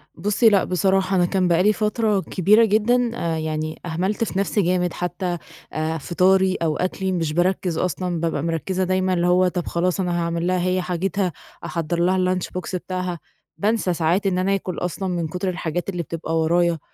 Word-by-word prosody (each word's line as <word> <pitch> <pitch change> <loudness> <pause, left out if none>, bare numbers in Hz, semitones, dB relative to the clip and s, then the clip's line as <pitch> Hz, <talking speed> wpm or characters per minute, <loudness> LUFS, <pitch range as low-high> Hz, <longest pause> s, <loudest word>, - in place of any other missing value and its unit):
بُصي، 210 +6 +3
لأ 200 -3 +3
بصراحة 190 +1 +1
أنا 180 -1 +4
كان 185 0 +1
بقى 175 +1 +3
لي 210 +2 +4
فترة 215 -1 +1
كبيرة 205 +5 +4
جدًا 230 +3 +2
آآ 165 -6 -2
يعني 155 0 -3
أهملت 185 +6 -1
في 195 -4 -2
نَفْسي 200 +1 +1
جامد 180 -1 +1
حتّى، 180 0 -3 0.4
آآ 155 +1 -1
فطاري 185 +4 +2
أو 160 -3 -1
أكلي 190 +1 -1
مش 165 -4 -1
باركّز 175 0 0
أصلًا، 180 -1 -1
بابقى 160 -3 -1
مركّزة 170 +3 -1
دايمًا 185 0 +1
اللي 175 -1 +1
هو 180 +1 +4
طَب 180 -1 -3
خلاص 180 +2 0
أنا 175 -2 0
هاعمل 170 0 -1
لها 185 0 +1
هي 185 0 +1
حاجتها، 180 +1 -1 0.3
أحضّر 170 0 -2
لها 180 +2 +2 0.2
الLunchbox 185 +1 -4
بتاعها، 180 -1 -3 0.4
بانسى 210 -3 +1
ساعات 175 +4 +1
إن 180 -2 +1
أنا 195 +2 +2
آكل 185 -2 -4
أصلًا 185 +2 -3
من 170 -2 -1
كتر 180 +4 -3
الحاجات 175 0 -3
اللي 175 -3 -3
بتبقى 165 +1 -3
ورايا، 170 +1 +2
180 Hz, 185 wpm, -22 LUFS, 170-190 Hz, 0.4 s, أنا